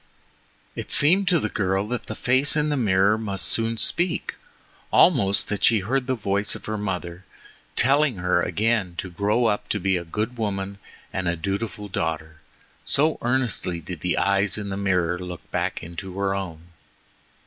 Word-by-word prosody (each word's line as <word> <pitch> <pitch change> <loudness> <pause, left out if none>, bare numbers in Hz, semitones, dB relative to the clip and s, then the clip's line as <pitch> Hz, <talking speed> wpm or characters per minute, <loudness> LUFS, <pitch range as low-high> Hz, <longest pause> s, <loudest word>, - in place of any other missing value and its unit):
It - - -6
seemed 185 +7 +5
to 175 -2 +4
the - - -1
girl 95 0 -1
that 125 -2 -4
the 110 - -5
face 130 +5 +2
in 150 0 +1
the 150 - +1
mirror 100 -3 +3
must 100 -3 -2
soon 115 0 0
speak, 170 +9 +1 0.6
almost 100 - +4
that 105 - -3
she 110 -3 +4
heard 130 +6 -1
the 130 - +1
voice 100 -2 -1
of - - -10
her 110 - -3
mother 90 -3 -4 0.5
telling 140 0 +3
her 90 -1 +1
again 100 -1 0
to 95 - -5
grow 105 +7 +1
up 105 -1 0
a 95 -3 0
good 110 +8 -4
woman 100 -2 -3 0.3
and 95 -1 -2
a 85 - +1
dutiful 100 +4 -4
daughter, 80 -4 -4 0.4
so 155 +3 +2
earnestly 120 -8 0
did 85 +1 -8
the 90 +2 -1
eyes 100 +1 +2
in 105 -1 -4
the 95 - -3
mirror 90 -3 0
look 90 -1 -8
back - - -2
into 90 +3 -8
her 100 0 0
own. 85 -3 -6
100 Hz, 170 wpm, -24 LUFS, 90-115 Hz, 0.6 s, seemed